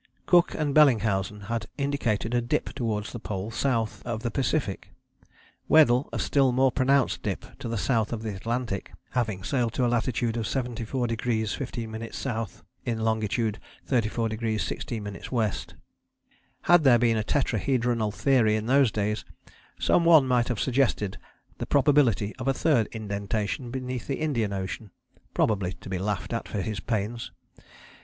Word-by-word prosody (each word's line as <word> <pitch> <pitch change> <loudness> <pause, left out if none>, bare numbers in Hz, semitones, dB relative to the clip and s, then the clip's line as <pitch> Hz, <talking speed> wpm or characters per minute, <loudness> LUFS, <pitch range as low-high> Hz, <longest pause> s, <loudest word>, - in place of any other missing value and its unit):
Cook 175 -1 +4
and 150 -2 -1
Bellingshausen 110 -8 +3
had 115 +2 -3
indicated 125 -6 -1
a 120 - +3
dip 120 - -1
towards 110 -5 -2
the 120 - -6
Pole 105 0 -4
south 115 -2 -1
of 115 -2 -4
the 120 - -1
Pacific; 135 -4 -1 0.8
Weddell 140 -4 +5
a - - -3
still 135 -3 +3
more 130 +1 +3
pronounced 135 +1 +2
dip - - -3
to - - -5
the 115 - -2
south 110 +3 +1
of 115 -2 -4
the 110 -3 -3
Atlantic, 115 0 -3 0.2
having 110 -6 -1
sailed 120 -2 0
to 125 - +1
a - - +3
latitude 120 0 0
of 115 - -1
74° 120 -1 -3 0.3
15´ 115 -1 -3 0.3
S. 110 - -9 0.2
in 115 -2 -2
longitude 110 0 0 0.3
34° 115 -2 0
16´ 110 -2 -3
W. 115 -5 +1 1.1
Had 175 -2 +5
there 130 -4 +7
been 115 -1 +2
a 110 - 0
Tetrahedronal 120 -3 0
Theory 115 -2 +3
in 110 0 -2
those 130 -1 +4
days, 105 +1 -1 0.6
some 170 - +3
one 160 -5 +6
might 125 -2 +2
have 120 -5 -2
suggested 125 -7 +1 0.4
the - - -3
probability 135 -8 +3
of 130 0 -5
a 135 - +2
third 135 -9 +2
indentation 105 +2 -3
beneath 125 -1 -4
the 135 - -2
Indian 125 -10 0
Ocean, 100 +2 -4 0.5
probably 95 -4 +1
to - - -11
be 95 -1 -2
laughed 100 +2 -2
at 115 - -3
for 105 - -3
his 110 -3 -3
pains. 115 +1 -3
115 Hz, 155 wpm, -27 LUFS, 110-130 Hz, 1.1 s, there